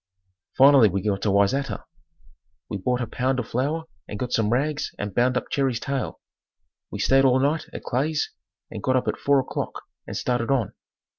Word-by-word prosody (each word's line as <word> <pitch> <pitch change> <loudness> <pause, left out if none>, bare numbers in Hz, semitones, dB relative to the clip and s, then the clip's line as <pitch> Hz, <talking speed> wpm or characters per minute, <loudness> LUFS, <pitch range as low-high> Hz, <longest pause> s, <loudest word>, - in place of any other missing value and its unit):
Finally 135 -4 +7
we 95 +2 -1
got 100 -1 0
to 105 - +1
Wayzata. 100 +8 +1 0.9
We - - -1
bought 125 +5 0
a - - 0
pound 130 +3 -1
of 120 -3 -3
flour 145 +7 -1 0.2
and 105 - -6
got 125 +3 -4
some 110 -2 +2
rags 145 +5 0
and 105 -1 -4
bound 125 +3 +2
up - - -4
Jerry's 135 -4 +1
tail. 135 0 -3 0.7
We - - -6
stayed 135 0 +4
all 130 -1 +4
night 145 +4 0
at - - -8
Clay's 150 +5 -1 0.4
and 110 - -6
got 130 +4 +1
up 130 - +1
at - - -1
4 140 -1 +3
o'clock - - -5 0.2
and - - -4
started 120 -1 -1
on. 125 -8 +1
125 Hz, 190 wpm, -24 LUFS, 115-140 Hz, 0.9 s, Finally